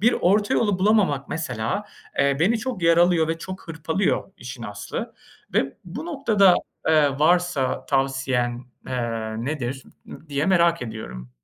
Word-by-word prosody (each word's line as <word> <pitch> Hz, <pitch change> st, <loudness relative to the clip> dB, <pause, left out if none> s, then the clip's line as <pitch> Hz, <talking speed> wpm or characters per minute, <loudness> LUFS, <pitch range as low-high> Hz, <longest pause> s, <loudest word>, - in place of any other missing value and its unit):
bir 235 Hz, +4 st, +4 dB
orta 205 Hz, +3 st, +2 dB
yolu 205 Hz, -5 st, +2 dB
bulamamak 190 Hz, -9 st, +2 dB
mesela, 125 Hz, -, -2 dB, 0.3 s
eee, 140 Hz, 0 st, +3 dB
beni 220 Hz, +7 st, +3 dB
çok 235 Hz, -5 st, -4 dB
yaralıyor 170 Hz, -1 st, +4 dB
ve 165 Hz, -, -1 dB
çok 185 Hz, 0 st, -8 dB
hırpalıyor 165 Hz, +5 st, -1 dB
işin 125 Hz, -1 st, -8 dB
aslı. 105 Hz, -2 st, -6 dB, 0.4 s
Ve 135 Hz, -, +1 dB
bu 235 Hz, -, -7 dB
noktada, 220 Hz, -, +4 dB, 0.3 s
eee, 155 Hz, -2 st, +5 dB
varsa 160 Hz, -5 st, +2 dB
tavsiyen, 135 Hz, -3 st, 0 dB, 0.3 s
eee, -, -, -3 dB, 0.5 s
nedir 135 Hz, -2 st, -3 dB, 0.5 s
diye 145 Hz, +3 st, -1 dB
merak 170 Hz, -4 st, +3 dB
ediyorum. 65 Hz, -, -7 dB
160 Hz, 130 wpm, -23 LUFS, 135-190 Hz, 0.5 s, eee